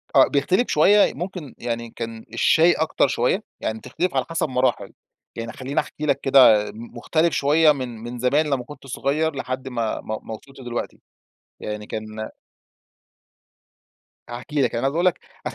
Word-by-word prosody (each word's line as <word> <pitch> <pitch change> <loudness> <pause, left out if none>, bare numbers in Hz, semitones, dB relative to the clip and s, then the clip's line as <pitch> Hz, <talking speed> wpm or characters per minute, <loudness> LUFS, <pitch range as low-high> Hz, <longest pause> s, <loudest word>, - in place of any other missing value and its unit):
آه، - - +7
بيختلف 180 - +1
شوية، 200 +7 +5
ممكن 175 -7 -6
يعني 115 -1 -4
كان 115 0 -7
الشاي 160 +8 +5
أكتر 160 -2 +1
شوية، 135 - 0 0.2
يعني 110 - -2
بتختلف 170 +10 -3
على - - +1
حسب 165 -2 -1
مراحل، 125 -6 0 0.4
يعني 115 0 -5
خلِّيني 135 +2 -2
أحكي 150 - -4
لك 150 - +1
كده، 125 -6 +6
م 115 +2 -11
مختلف 160 +7 +1
شوية 150 +2 +4
من 130 -5 -4
من 120 +1 -6
زمان 140 +6 +2
لما 135 -4 -1
كُنت 140 +1 -12
صغير 145 +4 -1
لحد 130 0 -4
ما 115 -4 -2
ما 110 0 -4
ما 110 - -7
وصلْت 135 +5 -12
لدلوقتي. 120 -2 -5 0.6
يعني 105 0 -5
كان 110 0 -6 2.0
هاحكي 135 +5 -3
لك، - - +1
يعني 115 - -1
عايز 135 +1 +1
أقول 175 +2 +1
لك 180 - +2 0.3
أنا - - -3
130 Hz, 165 wpm, -23 LUFS, 115-150 Hz, 2.0 s, آه